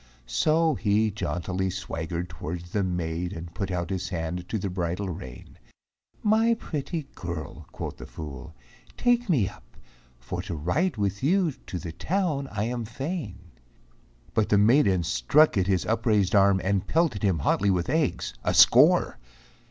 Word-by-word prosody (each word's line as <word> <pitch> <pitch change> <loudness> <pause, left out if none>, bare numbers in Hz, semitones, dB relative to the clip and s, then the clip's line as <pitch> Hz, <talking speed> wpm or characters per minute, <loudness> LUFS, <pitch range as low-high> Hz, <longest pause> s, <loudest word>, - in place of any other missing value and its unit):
So 155 - +2
he 110 -2 +1
jauntily 95 0 -2
swaggered 85 -2 -4
towards 85 +1 -7
the 105 - 0
maid 90 0 -2
And 85 -1 -8
put 95 +2 -3
out 90 -1 -2
his 95 0 -2
hand 90 +1 -4
to 110 - -1
the 100 - -3
bridle 90 +1 -2
rein. 80 -8 -9 0.6
"My 225 +2 +4
pretty 155 -5 -4
girl," 85 -5 -7
quoth - - -6
the - - -9
fool, 75 0 -8 0.4
"take 245 -2 +2
me 125 - +3
up, - - -13 0.4
For 85 +10 -5
to 90 -2 -5
ride 125 - 0
with 100 -1 -1
you 175 +4 +2
to 95 - -8
the 85 -1 -6
town 155 - -1
I 105 0 -2
am 120 +1 -2
fain." 130 - -6 0.8
But 110 - +1
the 105 - +4
maiden 105 - +4
struck 150 - +3
at 95 -2 +1
his 95 -3 +1
upraised 110 -4 +1
arm 100 -1 +5
And 100 0 0
pelted 160 - +1
him 95 -5 +2
hotly 100 +7 +1
with 90 -2 +1
eggs, 145 - 0
a - - 0
score. - - +6
100 Hz, 160 wpm, -26 LUFS, 85-130 Hz, 0.8 s, score